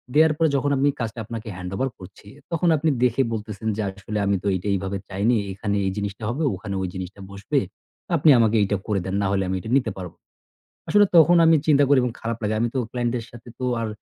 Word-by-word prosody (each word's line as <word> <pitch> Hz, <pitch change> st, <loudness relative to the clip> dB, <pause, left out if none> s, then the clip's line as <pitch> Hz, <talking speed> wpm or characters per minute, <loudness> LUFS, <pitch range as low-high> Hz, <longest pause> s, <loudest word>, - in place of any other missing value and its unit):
দেয়ার 155 Hz, 0 st, +5 dB
পরে 160 Hz, -2 st, +3 dB
যখন 145 Hz, +1 st, +1 dB
আমি 140 Hz, +2 st, +3 dB
কাজটা 115 Hz, -1 st, -4 dB
আপনাকে 115 Hz, 0 st, -7 dB
handover 95 Hz, +9 st, -3 dB
করছি 95 Hz, +2 st, -13 dB, 0.2 s
তখন 170 Hz, +1 st, 0 dB
আপনি 160 Hz, +2 st, +1 dB
দেখে 125 Hz, +2 st, +3 dB
বলতেছেন 110 Hz, -1 st, -5 dB
যে -, -, -1 dB
আসলে 100 Hz, +2 st, -6 dB
আমি 100 Hz, 0 st, +2 dB
তো -, -, -2 dB
এইটা 95 Hz, +2 st, -4 dB
এইভাবে 95 Hz, +1 st, -2 dB
চাইনি। 100 Hz, +5 st, +1 dB, 0.2 s
এখানে 100 Hz, +1 st, -2 dB
এই 95 Hz, -, 0 dB
জিনিসটা 100 Hz, +1 st, -4 dB
হবে, 140 Hz, +7 st, -2 dB
ওখানে 100 Hz, +1 st, -6 dB
ওই 95 Hz, -, -1 dB
জিনিসটা 95 Hz, +2 st, -7 dB
বসবে। 100 Hz, 0 st, -1 dB, 0.6 s
আপনি 155 Hz, 0 st, +4 dB
আমাকে 115 Hz, -1 st, +3 dB
এইটা 100 Hz, 0 st, 0 dB
করে 105 Hz, -2 st, 0 dB
দেন, 95 Hz, +1 st, -3 dB
না 100 Hz, -, +1 dB
হলে 95 Hz, -1 st, +1 dB
আমি 95 Hz, -, -1 dB
এটা 110 Hz, -, -8 dB
নিতে 120 Hz, -5 st, -1 dB
পারব 90 Hz, -3 st, -6 dB
না। -, -, -64 dB, 0.7 s
আসলে 205 Hz, 0 st, +5 dB
তখন 170 Hz, +2 st, +7 dB
আমি 160 Hz, 0 st, +6 dB
চিন্তা 145 Hz, -2 st, +5 dB
করি 140 Hz, -1 st, +5 dB
এবং 125 Hz, -2 st, -1 dB
খারাপ 115 Hz, 0 st, -3 dB
লাগে। 105 Hz, +1 st, 0 dB
আমি 120 Hz, -, +1 dB
তো -, -, 0 dB
client-দের 120 Hz, -2 st, -2 dB
সাথে 120 Hz, 0 st, -13 dB
তো 130 Hz, -, -4 dB, 0.2 s
আর 115 Hz, -, -2 dB
110 Hz, 225 wpm, -23 LUFS, 100-130 Hz, 0.7 s, তখন